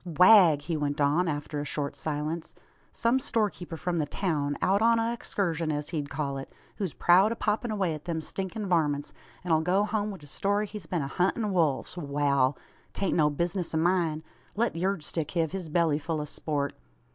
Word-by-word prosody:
"Wagh!" 180 -1 +7
he 165 +2 -2
went 145 -1 -2
on, 150 +5 +3
after 145 -1 -3
a - - -3
short 145 0 -3
silence. 155 +2 -4 0.4
"Some 235 +3 +2
storekeeper 205 -9 -2
from 175 0 -1
the 150 - 0
town, 145 -4 -1
out 195 +2 +2
on 230 +1 +5
a 230 +1 0
exkurshun, 165 -8 -1
as 150 0 -3
he'd 145 -3 -3
call 140 -1 -3
it, 135 - -9 0.3
who's 190 -7 -3
proud 185 +5 +5
o' - - -1
poppin' 225 +2 -1
away 195 -6 0
at 150 +1 -8
them 170 -2 -2
stinkin' 195 +6 -4
varmints, 150 -5 +1 0.3
an 175 -2 +1
'll 160 - +4
go 185 +5 +2
hum 210 0 -1
wi' 200 - -6
a - - -10
story 200 +8 0
he's 205 -4 -9
been 170 -5 -1
a - - -3
huntin' 195 +7 0
wolves! 160 -1 +1
Wal. 140 -3 +1 0.4
'Tain't 195 - -1
no 150 -3 +4
bizness 170 +3 -2
o' - - +2
myen. 165 -2 +1 0.3
Let 230 -1 0
yurd 185 0 -1
stick 155 0 -3
hev 165 -3 +1
his 185 -3 -5
belly 160 -2 +2
ful 160 +1 -2
o' 150 - -3
sport. 145 -1 -2
165 Hz, 200 wpm, -28 LUFS, 150-195 Hz, 0.4 s, Wagh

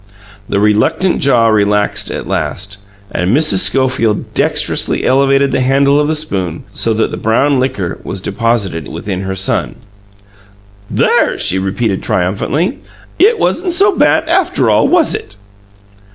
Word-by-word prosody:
The 100 - 0
reluctant 105 - +1
jaw 125 -4 +3
relaxed 105 -1 +1
at - - -5
last, 100 +2 -3 0.3
and 95 +9 0
Mrs. 150 -12 +3
Schofield 115 +1 0
dexterously - - +1
elevated 135 +1 +2
the - - 0
handle 140 +2 +2
of 150 - +1
the 155 - 0
spoon 95 - -3
so 115 - 0
that 110 - -1
the - - -5
brown 135 +5 +1
liquor 125 -9 -3
was 95 - -5
deposited 100 - -2
within 95 -2 -5
her 95 0 -4
son. 95 +1 -2 1.1
"There!" - - +1
she 95 - +3
repeated 95 +1 -2
triumphantly. 120 - -1 0.4
"It 440 +5 +4
wasn't 360 -4 -1
so 395 +2 +3
bad 315 +1 +2
after 360 +1 +1
all, - - +3
was 345 -4 +3
it?" 105 - -7
115 Hz, 140 wpm, -13 LUFS, 100-150 Hz, 1.1 s, It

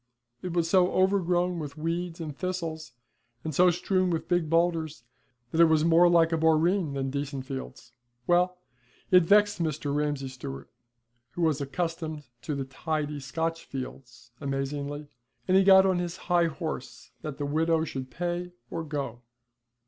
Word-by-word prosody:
It 180 -2 -4
was 170 -1 +1
so 180 0 +4
overgrown 180 -2 +2
with 150 -1 -6
weeds 165 +2 -3
and 155 -3 -5
thistles, 165 -6 -4 0.5
and 155 - -3
so 180 +5 +5
strewn 185 +1 +1
with 165 -2 -2
big 175 -3 +1
boulders, 165 -4 +1 0.5
that 165 - +3
it - - +9
was 160 -1 +3
more 170 +1 +6
like 165 -1 +4
a 165 - +1
boreen 160 +1 +2
than 135 -1 -2
decent 140 -1 -4
fields. 135 -1 -7 0.3
Well, 180 +1 +3 0.5
it 180 -1 +8
vexed 205 0 +4
Mr. 155 -3 -1
Ramsay 145 -2 -1
Stewart, 70 - -8 0.6
who 175 - -2
was 155 -3 +2
accustomed 160 +1 -3 0.2
to 150 - -3
the 135 -1 -3
tidy 150 +2 -3
Scotch 165 +4 -3
fields, 125 -1 -8
amazingly, 140 +1 -3 0.4
and 185 - +3
he 195 - +6
got 190 0 +7
on 185 -2 +2
his 175 0 -3
high 175 -2 +2
horse 160 -4 -6
that 150 -3 -6
the 145 - -2
widow 160 +2 +1
should 130 -4 -5
pay 175 +5 -3 0.2
or 165 - -3
go. 140 -6 -4
160 Hz, 160 wpm, -28 LUFS, 145-175 Hz, 0.6 s, it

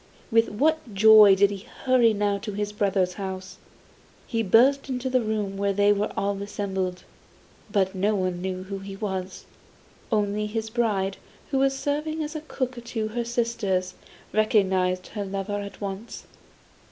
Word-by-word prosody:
With 225 0 +4
what 275 0 0
joy 215 -1 +8
did 200 +1 +4
he 200 0 -8 0.2
hurry 255 -3 +5
now 205 -1 0
to 210 +1 -6
his 205 +1 -2
brothers' 195 -3 +1
house! 190 -1 -6 0.7
He 230 - -1
burst 255 +7 +4
into 255 0 -2
a 255 - +5
room 210 -3 -2
where 200 0 0
they 205 +1 +4
were 205 +1 -1
all 200 0 -1
assembled, 190 -3 -3 0.7
but 190 -3 +1
no 200 +3 +1
one 185 -2 -1
knew 185 0 -3
who 195 +1 -6
he 195 0 -8
was. 190 -2 -5 0.7
Only 210 -1 0
his 220 +1 -4
bride, 205 -5 0 0.3
who 270 - +2
was 270 0 +2
serving 305 +3 -2
as 300 +2 -6
cook 255 -2 -3
to 225 -2 -3
her 235 +2 -2
sisters, 230 -6 -1 0.4
recognised 190 -4 +2
her 205 - -4
lover 195 +1 -3
at 200 0 -8
once. 200 +3 -6
205 Hz, 155 wpm, -25 LUFS, 195-230 Hz, 0.7 s, joy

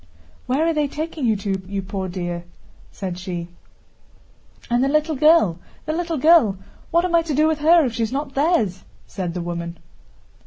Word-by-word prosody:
"Where 270 +6 +1
are 330 - +2
they 300 -2 +1
taking 305 -2 -3
you 220 - +3
to, 195 -1 -2
you 195 0 -3
poor 190 -1 -4
dear?" 175 -1 -4 0.5
said 185 -2 -5
she. 175 -2 -5 1.2
"And 240 +1 +2
the - - +2
little 305 +2 +1
girl, 290 - +4 0.3
the 310 - -2
little 335 -1 -2
girl, 295 - +5 0.3
what 340 +2 +2
am 360 - -2
I 335 - +5
to 320 -3 -3
do 305 +2 +4
with 315 -1 0
her 325 +1 +5
if 240 - -2
she's 225 0 -1
not 275 +1 -3
theirs?" 270 - +1 0.2
said 180 -3 -5
the 180 - -2
woman. 170 0 -5
255 Hz, 185 wpm, -22 LUFS, 185-315 Hz, 1.2 s, girl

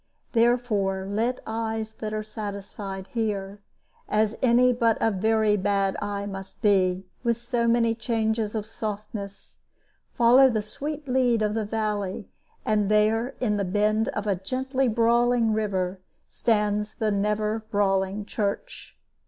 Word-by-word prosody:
Therefore 225 -5 +1
let 230 +5 -1
eyes 220 0 -3
that 215 -1 -5
are 215 0 -2
satisfied 200 -2 -6
here 205 -3 -2 0.5
as 215 +1 +2
any 250 0 +5
but 230 -2 +2
a 225 - +2
very 215 +1 +2
bad 195 -1 +1
eye 205 0 -3
must 195 +2 -8
be, 190 -2 +3 0.2
with 235 -2 +1
so 240 0 -1
many 230 -1 +3
changes 225 -2 -1
of 215 -2 -2
softness 210 -2 -6 0.5
follow 250 +3 +6
the 215 -4 -1
sweet 295 +7 -6
lead 250 -3 +2
of 210 0 0
the 220 -1 -1
valley; 210 -3 -3 0.3
and 210 -2 +1
there, 220 +4 +2
in 210 -4 0
a - - +1
bend 210 +4 +1
of 210 - -2
the 205 -1 +1
gently 260 +7 -1
brawling 235 0 +3
river, 190 -3 -1 0.3
stands 210 -1 0
the 215 -1 0
never 210 +2 0
brawling 195 0 +1
church. 200 -1 -4
215 Hz, 135 wpm, -26 LUFS, 205-230 Hz, 0.5 s, follow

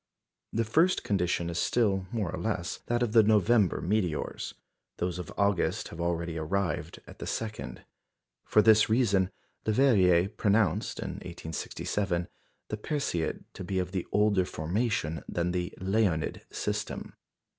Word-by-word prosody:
The 115 +1 0
first 160 +12 +3
condition 90 -3 0
is 85 0 -2
still, 95 -2 +1
more 105 -7 -1
or - - -5
less, 100 -5 -2
that 120 0 +1
of 115 - 0
the 115 0 +7
November 105 -1 +3
meteors; 90 -5 -1 0.4
those 90 0 -2
of 90 - -6
August 100 -3 +1
have 85 - -7
already 85 -1 -1
arrived 95 +4 -2
at - - -13
the - - -5
second. 110 - -4 0.6
For 105 - +4
this 110 -1 +6
reason, 100 -5 +3 0.4
Leverrier 100 -7 +4
pronounced, 105 -1 +1
in - - -4
1867, 85 +2 -3 0.4
the 105 - -3
Perseid 105 - -2
to - - -7
be 95 +1 -2
of 90 +1 -2 0.2
older 105 -2 +3
formation 85 -1 -1
than 85 0 0
the 90 0 -2
Leonid 95 -4 0
system. - - -3
95 Hz, 135 wpm, -29 LUFS, 85-110 Hz, 0.6 s, the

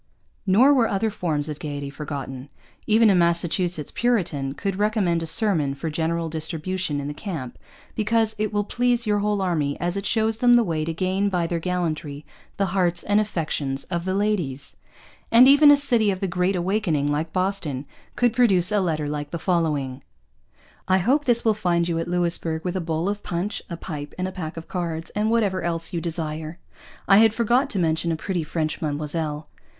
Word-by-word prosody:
Nor 240 +10 +6
were 245 -5 +3
other 210 +3 -1
forms 155 -7 -2
of 150 -1 -6
gaiety 145 -2 -5
forgotten. 140 -2 -6 0.4
Even 220 0 +5
a - - +4
Massachusetts 170 -2 +1
Puritan 170 - 0
could 195 -2 -3
recommend 205 -5 +1
a 165 - -3
sermon 160 -8 +3
for 160 +3 -4
general 165 +1 -1
distribution 160 0 -3
in 140 - -4
the 145 - -4
camp 145 - -6 0.4
because 220 0 +1
'It 215 -1 0
will 205 -1 0
please 245 +2 0
your 210 -1 +1
whole 205 -1 0
army, 155 -6 -1
as 175 +1 -2
it 200 0 -3
shows 220 -1 +1
them 245 +1 +5
the 240 - +5
way 160 -6 -2
to 165 - -2
gain 190 +4 0
by 180 -3 0
their 170 0 -2
gallantry 160 -5 -3 0.3
the 195 - +1
hearts 175 -3 +1
and 205 +1 +2
affections 150 -9 -2
of 170 -1 -1
the 185 0 -1
Ladys.' 180 -10 -2 0.6
And 240 +3 +8
even 285 +2 +7
a 290 - +8
city 240 -7 +2
of 190 -2 -1
the 195 - -1
'Great 180 +1 0
Awakening,' 175 -6 0
like 155 +2 -2
Boston, 185 -8 -2 0.3
could 245 -2 +2
produce 205 -7 +3
a 210 - +2
letter 155 -5 -1
like 145 0 -4
the 170 - -4
following: 150 -7 -1 0.9
I 185 - +4
hope 265 +11 +1
this 235 -2 +2
will 220 - +4
find 175 -5 0
you 165 -1 -1
at 165 - -3
Louisbourg 170 -2 -1
with 180 0 -2
a 185 - -1
bowl 165 +1 -2
of 205 +1 -2
Punch, 180 +4 -3
a 170 - -5
Pipe, 150 -4 -7
and 185 0 -2
a - - -5
Pack 165 -4 -6
of 165 - -8
Cards, 165 -3 -4
and 210 +1 0
whatever 205 -5 +1
else 165 +1 -3
you 170 - -2
desire. 160 -1 -4 0.5
(I 195 - +7
had 220 0 +5
forgot 240 +4 +2
to 200 - -2
mention 165 -1 0
a - - 0
Pretty 180 +2 -3
French 155 0 -3
Madammoselle.) 150 0 -3
175 Hz, 195 wpm, -23 LUFS, 155-205 Hz, 0.9 s, And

